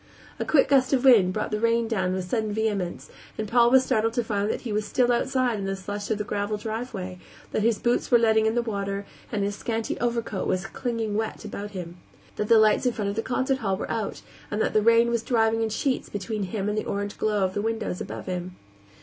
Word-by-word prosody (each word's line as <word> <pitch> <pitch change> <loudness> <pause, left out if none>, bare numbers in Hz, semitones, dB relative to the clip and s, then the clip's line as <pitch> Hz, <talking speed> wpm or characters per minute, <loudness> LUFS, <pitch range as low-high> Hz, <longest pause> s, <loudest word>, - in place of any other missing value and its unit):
A - - -1
quick 290 -4 +4
gust 270 -1 +3
of 265 0 +2
wind 215 -8 +7
brought 215 +3 -3
the 210 - -1
rain 230 0 +2
down 190 -5 0
with 185 -1 -3
sudden 220 +1 -1
vehemence, 205 -4 -2 0.3
and 215 - -3
Paul 235 +2 +5
was 260 +1 +5
startled 225 -1 +1
to 240 - +1
find 205 -1 -1
that - - -2
he 230 -4 -4
was 210 +1 0
still 245 +3 +2
outside 250 -2 +1
in 195 - -3
the 195 0 -1
slush 205 +2 -5
of 220 - +1
the 210 - -2
gravel 205 0 -2
driveway; 210 -4 -5 0.3
that - - 0
his 225 0 +2
boots 240 0 0
were 240 - +7
letting 220 -1 +3
in 220 - 0
the 240 - +2
water 200 -2 -3 0.3
and 210 -3 0
his 200 0 -1
scanty 225 +1 -3
overcoat 235 -4 -1
was 185 0 0
clinging 225 -2 -3
wet 220 -1 -3
about 205 0 -5
him; 175 -1 -7 0.4
that 210 - -1
the 230 - +6
lights 215 +3 +4
in 245 - +1
front 205 -3 -2
of - - -6
the 225 - 0
concert 260 +2 0
hall 195 -5 -1
were - - -4
out 220 -3 -3 0.3
and 210 - -2
that - - +1
the 215 - +4
rain 230 +2 +5
was 235 -1 +1
driving 225 -1 +2
in 225 - 0
sheets 255 +4 -1
between 205 0 -3
him 195 +2 -3
and 210 +1 0
the - - -5
orange 205 0 -3
glow 210 -2 +1
of 185 - -2
the 205 - -1
windows 220 -4 -2
above - - -6
him. 180 0 -4
215 Hz, 245 wpm, -26 LUFS, 205-230 Hz, 0.4 s, wind